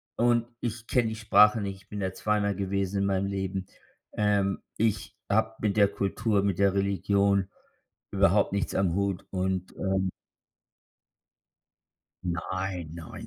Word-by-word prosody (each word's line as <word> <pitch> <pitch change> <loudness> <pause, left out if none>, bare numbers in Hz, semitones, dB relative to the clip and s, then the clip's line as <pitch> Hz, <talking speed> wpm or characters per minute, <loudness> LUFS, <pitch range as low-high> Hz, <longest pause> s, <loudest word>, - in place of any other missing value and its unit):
und 120 -1 +3 0.2
ich 115 -1 -4
kenne 120 -3 +2
die 110 - -4
Sprache 105 0 +5
nicht. 100 -2 -5
Ich - - -36
bin 105 - -5
da 95 -1 -2
zweimal 105 0 0
gewesen 100 0 -1
in 100 - +1
meinem 95 0 +1
Leben. 95 -1 -3 0.5
Ähm, 100 -2 +1 0.2
ich 110 0 -1
habe 110 +2 +1
mit 105 -2 0
der 100 -2 +5
Kultur, 100 +1 0
mit 100 -3 0
der 100 -1 +4
Religion 100 0 +1 0.6
überhaupt 100 +1 +3
nichts 100 - -1
am 95 -3 +2
Hut 100 -2 -1
und, 95 -1 -2
ähm 95 -1 0 2.1
Nein, 90 0 -3
nein, 85 -1 -9
100 Hz, 140 wpm, -28 LUFS, 95-105 Hz, 2.1 s, Sprache